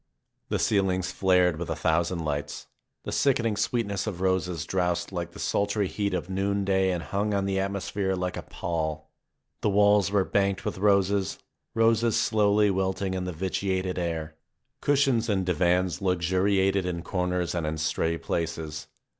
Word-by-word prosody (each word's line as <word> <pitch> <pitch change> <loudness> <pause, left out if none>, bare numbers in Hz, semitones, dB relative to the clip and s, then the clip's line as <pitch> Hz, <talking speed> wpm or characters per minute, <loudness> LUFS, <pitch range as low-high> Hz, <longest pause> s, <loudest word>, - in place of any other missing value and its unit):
The - - +1
ceilings 95 -3 +1
flared 90 -3 +3
with 85 - -4
a 80 - -1
thousand 80 +2 0
lights; 75 -1 -3 0.4
the - - -5
sickening 120 -6 +2
sweetness 100 -1 -1
of 95 -5 -4
roses 90 -3 0
drowsed 90 0 -1
like 85 -2 -4
the 100 - -11
sultry 100 0 0
heat 100 0 -2
of 90 - -3
noonday 95 0 +1
and 90 -2 -2
hung 100 +3 -1
on 100 -1 0
the 95 0 0
atmosphere 100 0 -1
like 90 0 -2
a - - -4
pall; 80 -2 -4 0.5
the - - +2
walls 105 0 +4
were 100 -2 +2
banked 100 -1 0
with - - -3
roses, 100 -1 +2 0.4
roses 115 0 +3
slowly 105 -1 +3
wilting 95 0 -1
in 95 -1 -2
the 90 - -3
vitiated 95 +1 -2
air. 80 -2 -3 0.5
Cushions 135 -5 +2
and 95 -3 +1
divans 90 +1 +1
luxuriated 95 +2 +2
in 85 -2 -3
comers 90 -1 -1
and 85 -3 -2
in 80 +1 -2
stray 80 +1 0
places. 80 -3 -4
95 Hz, 155 wpm, -27 LUFS, 85-100 Hz, 0.5 s, walls